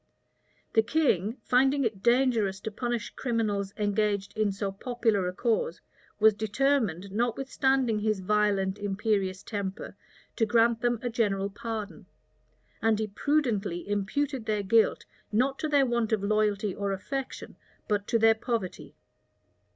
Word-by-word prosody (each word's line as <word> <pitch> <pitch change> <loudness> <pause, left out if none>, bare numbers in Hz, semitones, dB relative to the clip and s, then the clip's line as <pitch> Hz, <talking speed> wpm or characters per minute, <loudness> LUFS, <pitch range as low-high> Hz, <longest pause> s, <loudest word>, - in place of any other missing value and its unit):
The 225 - +5
king, 230 - +1
finding 270 +2 +3
it 215 -5 -2
dangerous 235 -5 +2
to 220 - -4
punish 240 0 -3
criminals 215 -5 -1
engaged 205 -1 0
in 215 -2 +1
so 195 0 -3
popular 220 -2 0
a - - -1
cause, 215 -4 -1 0.4
was 220 0 +6
determined, 215 - 0
notwithstanding 245 +1 +1
his 215 -1 0
violent, 200 0 +1
imperious 200 -1 -1
temper, 200 -3 -5 0.4
to 225 - +3
grant 230 +1 +3
them 240 -1 +1
a 245 - -2
general 200 -4 0
pardon; 215 0 -6 0.7
and 225 -1 +3
he 220 - -1
prudently 215 - -1
imputed 220 +6 -2
their 210 -2 0
guilt, 220 +3 +3 0.3
not 260 +5 +1
to 310 - -1
their 285 -2 +4
want 235 -3 0
of 215 -3 +1
loyalty 210 -1 +1
or 200 0 -2
affection, 270 +7 -5 0.3
but 205 -1 -1
to 235 - +2
their 225 0 +6
poverty. 225 -4 -4
215 Hz, 135 wpm, -28 LUFS, 200-240 Hz, 0.7 s, was